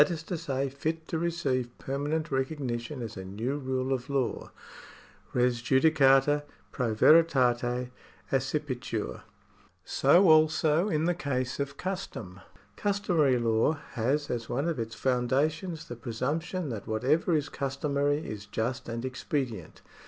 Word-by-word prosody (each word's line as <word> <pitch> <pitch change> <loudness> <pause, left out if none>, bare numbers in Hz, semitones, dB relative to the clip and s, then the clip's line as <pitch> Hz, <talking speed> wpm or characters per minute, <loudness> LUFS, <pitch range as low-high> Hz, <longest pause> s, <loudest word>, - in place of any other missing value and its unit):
is 165 -2 -4
to 175 - -4
say, 140 -4 -2
fit 160 +4 -3
to 160 - -2
receive 150 -8 -1
permanent 145 +4 -2
recognition 130 -2 -2
as 115 - -6
a 95 - -6
new 115 +9 -3
rule 130 0 -1
of 130 +1 -4
law. 135 -4 -1 0.8
Res 125 -1 +1
judicata 135 +1 +4 0.3
pro 120 -5 -1
veritate 125 -4 +4 0.4
accipitur.'^ 135 -1 -2 0.6
So 185 +2 +4
also 155 +3 +4
in 155 -2 +1
the 175 - +2
case 130 -6 -2
of 140 0 -3
custom. 180 - -5 0.4
Customary 180 -10 +2
law 115 +4 +2 0.2
has 135 +5 0
as 115 -2 -3
one 140 +6 -1
of 165 -6 -1
its 115 0 -4
foundations 150 +7 0
the 120 - -6
presumption 140 +8 -3
that 110 -5 -6
whatever 140 +10 +2
is 145 -2 0
customary 140 +2 -1
is 105 -1 -7
just 115 +4 -3
and 115 +2 -4
expedient. 130 - -4
135 Hz, 130 wpm, -29 LUFS, 125-155 Hz, 0.8 s, judicata